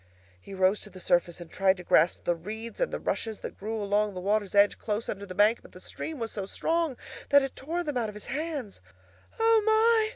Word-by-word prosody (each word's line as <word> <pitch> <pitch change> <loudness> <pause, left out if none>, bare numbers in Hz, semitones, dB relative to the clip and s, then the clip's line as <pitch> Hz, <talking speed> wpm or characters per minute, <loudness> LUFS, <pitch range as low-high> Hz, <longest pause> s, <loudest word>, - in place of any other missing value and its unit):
He 195 - -9
rose 190 +2 +2
to 210 - -8
the 185 -1 -12
surface 175 -1 +1
and 170 -2 -10
tried 195 0 +3
to 180 - -9
grasp 175 - +3
the 175 - +2
reeds 220 - -7
and - - +1
the - - -3
rushes 220 -2 -3
that - - -7
grew 220 +2 -3
along 205 0 0
the - - -4
water's 205 +1 0
edge 200 0 +5
close 215 +1 -2
under 200 0 -5
the 185 - -8
bank, 210 +4 +4
but - - -17
the - - -11
stream 320 -1 -6
was 230 -3 -4
so 200 -3 -4
strong 325 +1 -1 0.3
that 285 -1 +6
it 270 - -4
tore 335 +6 -3
them 295 -5 -2
out 230 -3 0
of 210 - -10
his 210 - -9
hands. 290 - -4 0.6
"O 450 -1 +5
my!" 440 0 +4
215 Hz, 235 wpm, -28 LUFS, 195-295 Hz, 0.6 s, that